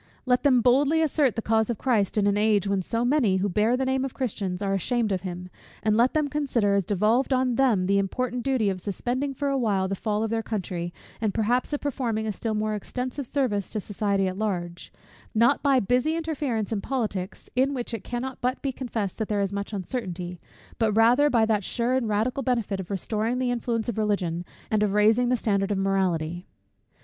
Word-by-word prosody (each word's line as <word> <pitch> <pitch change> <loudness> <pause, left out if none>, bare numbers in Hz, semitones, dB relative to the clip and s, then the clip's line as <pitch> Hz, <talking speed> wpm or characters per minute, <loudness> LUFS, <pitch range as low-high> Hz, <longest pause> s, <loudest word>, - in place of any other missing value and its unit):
Let 250 -1 +3
them 260 -4 +4
boldly 280 +6 +4
assert 290 -5 +2
the 225 - -3
cause 220 0 +2
of 235 - -1
Christ 220 -7 +1
in 205 - +3
an 205 0 +3
age 210 -2 +2
when 195 -1 +1
so 230 +5 -1
many, 245 -8 +3
who 190 +2 0
bear 215 +6 +2
the 265 - 0
name 265 0 +1
of 270 - -4
Christians, 200 -8 -2
are 200 -1 -1
ashamed 220 +3 0
of 185 -2 0
Him: 180 -1 -6 0.4
and 215 0 +2
let 240 +5 +3
them 305 -1 +2
consider 265 -8 +1
as 200 -2 +1
devolved 215 +7 +2
on 255 -1 +2
Them 230 -8 +2
the 200 +1 +3
important 245 +5 -2
duty 240 -5 +1
of 185 -1 -5
suspending 250 +8 -2
for 285 +2 -1
a 275 - +1
while 200 -5 +1
the 195 - -2
fall 210 +2 -1
of 225 - -2
their 225 0 0
country, 180 -6 -4 0.3
and, 215 -3 0
perhaps, 240 +5 +1
of 290 - -2
performing 235 -6 -2
a 215 - -1
still 220 +2 -3
more 215 0 -1
extensive 250 +5 -4
service 225 -9 -1
to 215 - -3
society 200 -1 0
at 185 +1 -3
large; 175 -5 -3 0.4
not 235 +5 +4
by 275 -3 +4
busy 250 +8 +1
interference 290 -10 -2
in 210 -3 -1
politics, 210 -8 -3
in 270 +2 +2
which 245 -2 -4
it 225 - -4
cannot 245 +2 -5
but 250 +1 0
be 275 - 0
confessed 230 -7 -4
there 210 -1 0
is 200 0 -1
much 200 +1 -4
uncertainty; 180 -4 -5 0.4
but 220 -2 +2
rather 240 +7 +5
by 230 -5 +3
that 215 -2 +1
sure 240 +5 -1
and 255 -4 0
radical 225 +6 0
benefit 230 -6 -1
of 185 - -6
restoring 215 +4 -1
the 255 -1 0
influence 235 -2 -1
of 235 -2 -2
Religion, 180 -5 -1 0.3
and 215 -1 +2
of 205 -2 +1
raising 220 +4 +4
the 250 - +2
standard 200 -3 0
of 205 - 0
morality. 180 -3 0
220 Hz, 215 wpm, -26 LUFS, 200-250 Hz, 0.4 s, rather